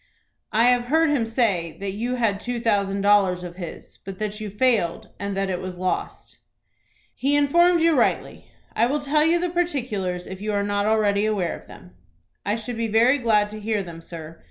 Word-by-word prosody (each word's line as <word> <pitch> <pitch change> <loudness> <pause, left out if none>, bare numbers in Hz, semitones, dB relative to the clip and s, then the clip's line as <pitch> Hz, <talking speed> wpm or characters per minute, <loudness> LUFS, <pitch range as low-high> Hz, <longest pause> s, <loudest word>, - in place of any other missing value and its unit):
"I 220 +2 +3
have 245 -1 +2
heard 320 +4 +3
him 245 -6 +1
say 205 -9 0
that 200 0 -3
you 235 +5 -2
had 220 -5 0
two 245 +2 -3
thousand 200 -4 0
dollars 195 -3 +3
of 175 0 -8
his, 175 -3 -9
but 195 -1 -7
that 210 +1 -4
you 210 - -4
failed, 210 -5 0
and 200 0 -3
that 195 0 0
it 180 - -3
was 185 -1 -6
lost." 185 0 -4 0.7
"He 280 +2 0
informed 340 +4 +4
you 330 -1 +4
rightly. 250 - 0 0.3
I 230 - +3
will 290 +4 0
tell 295 +1 +2
you 335 +2 +3
the 355 0 -1
particulars, 230 - -2
if 190 0 -8
you 210 0 -2
are 200 0 +1
not 205 0 0
already 215 -1 +2
aware 195 -5 -1
of - - -14
them." 90 - -14 0.5
"I 205 - 0
should 225 +1 -5
be 230 0 -1
very 235 +6 +4
glad 210 -4 +2
to 215 - -7
hear 215 -1 -1
them, 170 -2 -9
sir. 165 -1 -9
215 Hz, 205 wpm, -23 LUFS, 195-250 Hz, 0.7 s, informed